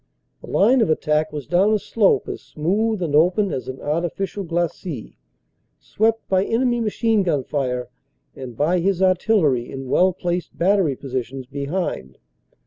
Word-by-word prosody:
The - - -10
line 245 +5 +4
of 220 - +2
attack 155 0 +1
was 145 -3 -6
down 190 +5 +3
a - - +4
slope 210 0 +1
as - - -5
smooth 200 +6 -1
and 155 -4 -2
open 180 +6 +3
as 130 - -4
an 130 0 -6
artificial 175 +6 -2
glacis, 170 - -3 0.7
swept 225 +1 0
by 190 0 +2
enemy 240 +3 +1
machine 225 0 +1
gun 150 -8 0
fire 125 -3 -2 0.5
and 125 -3 -9
by 170 +5 +2
his 190 +1 +1
artillery 180 - +2
in 135 -1 -6
well 185 +7 +4
placed 175 -1 -4
battery 180 -5 +2
positions 130 -1 -5
behind. 140 - -4
175 Hz, 150 wpm, -21 LUFS, 140-200 Hz, 0.7 s, line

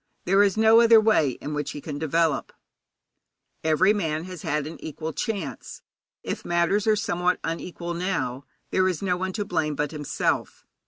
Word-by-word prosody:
There 195 +3 +4
is 200 0 +2
no 220 +1 +6
other 230 -1 +7
way 215 -10 +3
in 150 - -4
which 150 +1 -3
he 145 - -6
can 145 0 -6
develop. 160 -1 0 1.1
Every 160 +6 +4
man 160 -6 -2
has 180 -2 -8
had 150 0 -1
an 155 - -9
equal 160 +1 -5
chance. 190 - -5 0.4
If - - -4
matters 175 +5 +1
are 215 - +5
somewhat 180 -4 0
unequal 170 +1 -4
now, 170 -7 -2 0.3
there 185 0 +3
is 180 0 -3
no 180 -2 +1
one 185 +1 -3
to 205 0 -2
blame 160 -5 -1
but 150 +1 -2
himself. 150 -3 -2
170 Hz, 170 wpm, -25 LUFS, 155-195 Hz, 1.1 s, other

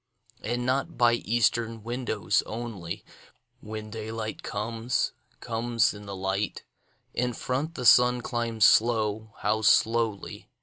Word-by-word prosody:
And 120 +2 -2
not 135 +6 -1
by 120 -1 +5
eastern 115 -1 0
windows 120 -2 0
only, 110 -7 -6 0.5
When 110 0 -7
daylight 110 0 -5
comes, 115 +3 -2 0.3
comes 115 0 +1
in 105 -1 -11
the 100 - -5
light; 95 +2 -2 0.5
In 125 0 0
front 140 +8 -3
the 125 - -4
sun 125 +1 +6
climbs 115 -3 +1
slow, 110 -1 +3
how 110 +1 +1
slowly! 110 -1 +1
115 Hz, 120 wpm, -27 LUFS, 110-120 Hz, 0.5 s, sun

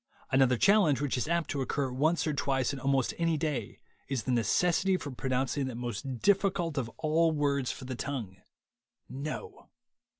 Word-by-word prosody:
Another 130 -2 +4
challenge 185 - +4
which 145 -2 -1
is 125 - -1
apt 170 0 0
to 140 - -2
occur 135 0 -1
once 155 +7 +1
or 155 - 0
twice 135 -2 0
on 140 - -5
almost 135 -1 +1
any 165 -1 +2
day 145 -9 -3 0.3
is 130 -4 -2
the 130 - -2
necessity 180 - +2
for 145 - -6
pro 130 +1 -4
nouncing 130 +2 0
that 130 - -5
most 120 +1 -5
difficult 190 -5 +2
of 130 -5 -2
all 160 +1 +2
words 140 -4 0
for 130 - -8
the 130 - -4
tongue 120 -8 -5 0.5
— - - -56 0.2
No. 155 - -7
140 Hz, 180 wpm, -30 LUFS, 130-160 Hz, 0.5 s, Another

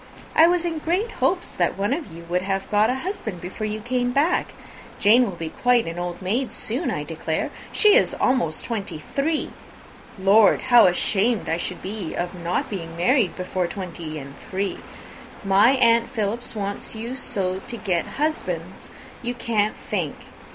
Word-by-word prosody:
I 325 - +8
was 350 0 +2
in 330 -2 -2
great 360 +9 0
hopes - - 0
that - - 0
one 205 +6 +1
of 305 - -4
you 165 +1 -10
would 180 +1 0
have 195 0 -2
got 210 +2 +4
a 250 - +1
husband 230 - -4
before 190 +5 -5
you 215 +1 -3
came 245 +2 -1
back. 290 +7 +1 0.4
Jane 220 +5 +6
will 190 -6 -5
be 165 -1 -4
quite 245 +5 +2
an 165 +1 -5
old 175 +1 -4
maid 235 +8 -1
soon, 250 +10 0
I - - -2
declare. - - -3 0.2
She 425 -2 +5
is - - +4
almost 240 -12 0
three 230 - -2
and 195 - -8
twenty! 275 - -2 0.6
Lord! 200 +2 +5
how 240 -5 +9
ashamed 205 +5 +1
I 165 - 0
should 180 +1 -5
be 195 -3 -4
of 175 +1 -3
not 175 0 -2
being 165 -5 -6
married 210 - +2
before 185 -1 -2
three 170 -5 -6
and 140 -1 -8 0.2
twenty! 195 +1 -2 0.6
My 200 +6 +5
aunt 235 -3 +4
Philips 225 +2 -3
wants 200 +1 -4
you 230 +3 -5
so 190 -7 -1
to 235 - -5
get 180 -6 -1
husbands 310 +2 -2 0.3
you 245 0 -3
can't 215 -3 0
think. - - -3
210 Hz, 175 wpm, -23 LUFS, 180-245 Hz, 0.6 s, how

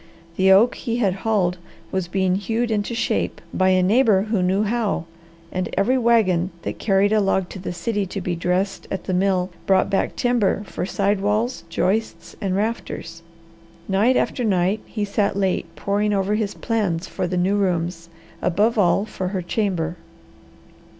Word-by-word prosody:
The 190 +1 +4
oak 215 +6 +6
he 235 -2 -3
had 200 -6 +2
hauled 185 -5 +1 0.3
was 190 -2 -1
being 190 0 +1
hewed 225 +4 -1
into 215 +2 -1
shape 230 - -1
by 185 0 +3
a 185 -1 +4
neighbour 210 -1 +4
who 210 -5 +2
knew 190 +3 +2
how, 215 -5 -1 0.5
and 185 0 -2
every 225 +7 +3
wagon 220 -8 +3
that - - -5
carried 200 0 +2
a 215 - +4
log 190 -2 +1
to 190 - -8
the 180 - -4
city 200 +3 -2
to 195 - -5
be 180 -1 -2
dressed 180 +3 -1
at 190 - -4
the 185 - -3
mill 185 0 +1 0.2
brought 190 0 +3
back 195 - 0
timber 240 -5 +1
for 185 - -4
side 200 +1 0
walls, 215 +4 0
joists, 210 +6 -1
and 190 -3 -1
rafters. 205 -5 -3 0.7
Night 210 +7 +3
after 250 - 0
night 195 -1 +1
he 210 -2 -2
sat 200 0 0
late 190 -3 0
poring 205 +6 0
over 195 +1 +1
his 210 -1 -1
plans 195 -7 -1
for - - -3
the 180 +1 -2
new 185 +3 +2
rooms, 170 -3 -1 0.3
above 210 +6 +2
all 195 +2 +3
for 190 -4 -4
her 190 0 -2
chamber. 175 -3 -1
195 Hz, 170 wpm, -22 LUFS, 185-215 Hz, 0.7 s, oak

